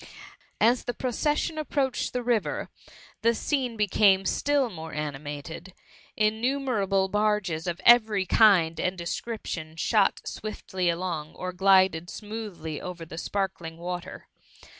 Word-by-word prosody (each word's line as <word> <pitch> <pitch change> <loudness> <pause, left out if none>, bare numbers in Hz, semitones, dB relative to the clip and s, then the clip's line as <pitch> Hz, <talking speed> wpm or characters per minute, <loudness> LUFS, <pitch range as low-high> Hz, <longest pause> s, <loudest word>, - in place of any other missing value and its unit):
As 235 +3 +3
the 245 - -3
procession 300 +5 -1
approached 280 -4 -1
the 250 - -2
river, 235 -3 0 0.5
the 230 +1 +3
scene 255 -3 -1
became 200 -2 +4
i^ill 280 +4 +1
more 160 -2 -8
animated; 150 +4 -6 0.4
innumerable* 215 -3 +1
bai^ges 205 -5 0
of 175 0 -2
every 220 -5 +6
kind 180 -7 +4
and 185 +2 -1
description 170 -3 -5
shot 200 +4 +2
swiftly 190 -4 -3
along, 170 -3 -3
or 185 0 -5
glided 185 -3 +4
smoothly 210 -8 -6
over 180 -2 -7
the 160 +1 -7
sparkling 170 -5 -3
water. 180 +1 -6
195 Hz, 120 wpm, -27 LUFS, 170-225 Hz, 0.5 s, every